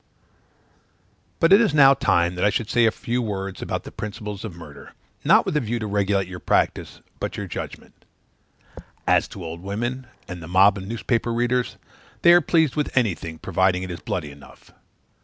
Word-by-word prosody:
But 165 +3 +5
it 200 - +7
is 205 -10 +1
now 135 -2 +8
time 85 -9 +1
that 90 - -3
I 100 - +5
should 110 +1 -2
say 120 -1 +4
a - - +3
few 120 +2 -3
words 95 -4 -4
about - - -3
the - - -10
principles 105 -1 -6
of 105 -6 -7
murder, 85 - -12 0.3
not - - +5
with - - -2
a - - +4
view 120 0 -2
to 110 - -4
regulate 100 -2 0
your 90 -1 -8
practice, - - -1 0.2
but - - -4
your - - -4
judgment: - - -8 1.0
as - - +3
to 90 - -9
old 85 +1 -7
women, 120 +7 -4 0.2
and 90 -1 -7
the 80 - -9
mob 95 +3 +4
of 95 - -8
newspaper 115 +1 -1
readers, 120 +1 0 0.5
they 170 - +8
are 175 - +6
pleased 160 -3 +2
with 150 -3 -2
anything, 85 -8 0
provided 95 +1 0
it 90 - -6
is 85 - -6
bloody 75 -5 -4
enough. 70 0 -17
105 Hz, 190 wpm, -23 LUFS, 95-120 Hz, 1.0 s, now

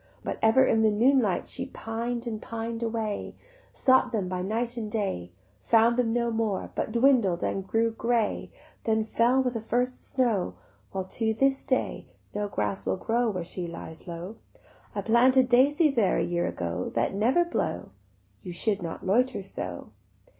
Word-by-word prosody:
But - - -4
ever 225 +4 +5
in 225 - +3
the 220 - +5
noonlight 235 -2 +2
She - - -3
pined 235 +2 -4
and 220 -2 -4
pined 230 0 -5
away; 225 -2 -3 0.4
Sought 260 -1 +3
them 210 -6 -1
by 180 0 -3
night 230 +5 -2
and 220 -3 -4
day, 190 - -2 0.3
Found 230 - +4
them 240 -2 +2
no 235 0 0
more, 220 -4 -1
but - - -2
dwindled 235 -7 +3
and 195 -1 -2
grew 225 +2 +1
grey; 230 -1 -1 0.3
Then 220 -1 +2
fell 240 +4 +2
with 250 -1 -1
the 225 - -3
first 245 +3 -2
snow, 235 -8 0 0.4
While 190 -1 -2
to 220 +4 0
this 270 +3 +2
day 260 - -1 0.3
no 205 0 -2
grass 195 -1 -2
will - - -1
grow 235 +4 0
Where 185 -5 -3
she 175 0 -4
lies 165 -1 -9
low: 175 +5 -7 0.6
I - - -1
planted 250 +3 +4
daisies 280 +5 +4
there 210 -6 +3
a - - +1
year 175 0 0
ago 85 +1 -3
That 115 +8 +1
never 245 - +3
blow. 345 - -3 0.5
You 180 -3 -7
should 200 +3 0
not 165 +1 -6
loiter 245 +3 +2
so." 195 - -6
225 Hz, 170 wpm, -27 LUFS, 195-245 Hz, 0.6 s, ever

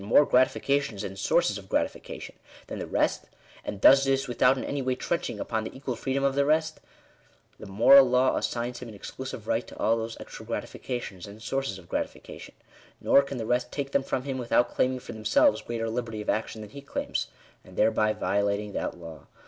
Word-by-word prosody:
more 115 +8 +5
gratifications 130 -4 +1
and 95 -1 -6
sources - - +2
of - - -15
gratification - - -3 0.3
than - - -6
the - - -4
rest, - - 0 0.4
and 100 - -5
does 135 +6 +7
this 135 0 +1
without 125 +2 +3
in - - -3
any 140 -1 -2
way 130 -1 0
trenching 170 +6 -2
upon 110 -2 -2
the 110 - -7
equal 130 -2 -4
freedom 135 +3 -2
of 140 -1 +2
the 140 +1 +2
rest, 155 +2 +1 0.8
the 105 - -9
moral 125 +7 +7
law 125 +1 +3
assigns 120 +1 -2
him 125 - -8
an 110 - -10
exclusive 120 +1 -7
right 115 +1 0
to - - -12
all 115 - +2
those 115 0 -4
extra - - -9
gratifications 105 -7 -5
and 100 +2 -11
sources 135 -7 -2
of 90 -2 -14
gratifica - - -4
tion; - - -12 0.4
nor 140 - +5
can 140 -1 -6
the 115 - -3
rest 125 +2 0
take 140 -1 -4
them 140 - +2
from 130 -1 -2
him 135 -1 -3
without 120 0 +2
claiming 130 0 +1
for - - -9
themselves 280 - +3
greater 115 -1 -3
liberty 115 -1 -3
of 105 - 0
action 110 0 -3
than 105 -1 -10
he 140 - -9
claims, 140 - -3 0.4
and 95 - -15
thereby 110 0 +3
violating 100 0 -1
that - - -3
law. 80 -2 -11
125 Hz, 205 wpm, -27 LUFS, 110-135 Hz, 0.8 s, does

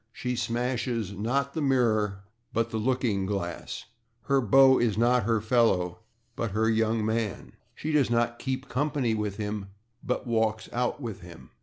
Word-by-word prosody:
She 125 +2 -3
smashes, 120 -3 -1
not 125 +7 -1
the 160 - -2
/mirror/, 110 -8 +2 0.3
but 115 0 0
the 110 - -1
/looking 115 -5 0
glass/. 95 -4 -4 0.4
Her 135 -1 +2
beau 130 +3 +6
is 110 -4 +1
not 120 -1 +3
her 115 -1 +2
/fellow/, 105 -6 +2 0.4
but 115 -4 -3
her 110 +1 +2
/young 110 0 +2
man/. 110 -2 -2 0.2
She 155 - -3
does 145 -5 +3
not 120 0 +1
/keep 130 0 -3
company/ 135 -3 0
with 105 -2 -2
him 105 -2 -3 0.4
but 125 0 -2
/walks 110 -2 0
out/ 125 +4 -1
with 110 -5 -5
him. 85 -8 -13
115 Hz, 160 wpm, -27 LUFS, 105-125 Hz, 0.4 s, beau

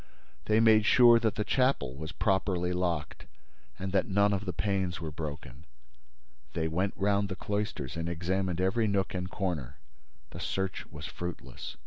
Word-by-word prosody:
They 110 +1 +3
made 110 -2 +5
sure 120 -2 +7
that 110 -3 0
the 105 - 0
chapel 125 - +1
was 80 +4 -6
properly 95 -3 0
locked 85 -7 -2 0.5
and 95 +1 -4
that 95 -1 +2
none 100 +1 +3
of 100 0 -2
the 95 - -1
panes 95 -1 -1
were 80 -2 -5
broken. 75 -3 -7 0.9
They 80 -1 0
went 90 +5 -1
round 100 0 +1
the 95 - -3
cloisters 100 - -3
and 85 0 -2
examined 90 +1 -1
every 110 +5 +2
nook 100 -2 0
and 90 0 -3
corner. 80 -10 -3 0.5
The - - -8
search 95 -1 -3
was 75 -2 -9
fruitless. 85 -5 -7
95 Hz, 160 wpm, -30 LUFS, 85-100 Hz, 0.9 s, sure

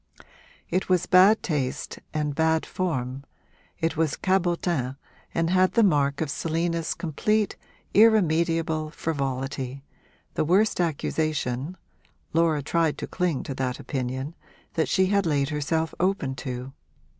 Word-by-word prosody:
It 185 +2 0
was 180 -2 +3
bad 190 +4 +6
taste 140 -7 -2
and 150 -2 -1
bad 160 +1 +2
form, 135 -7 -3 0.5
it 165 0 -1
was 160 -2 0
cabotin 175 -8 0 0.4
and 165 0 0
had 185 0 +3
the 230 - +4
mark 145 -6 +2
of 155 -3 -1
Selina's 165 +1 -1
complete, 210 +6 0 0.4
irremediable 165 -7 +3
frivolity 135 -3 -3 0.5
the - - +1
worst 190 +7 +3
accusation 155 -2 -1 0.6
(Laura 160 -3 +2
tried 165 +1 +1
to - - -4
cling 175 -7 -1
to 135 - -4
that 130 -1 -2
opinion) 130 +2 -3 0.4
that 160 - 0
she 190 - +3 0.2
laid 145 -6 +1
herself 160 +2 -1
open 180 -7 +1
to. 125 +1 -6
160 Hz, 120 wpm, -26 LUFS, 140-175 Hz, 0.6 s, bad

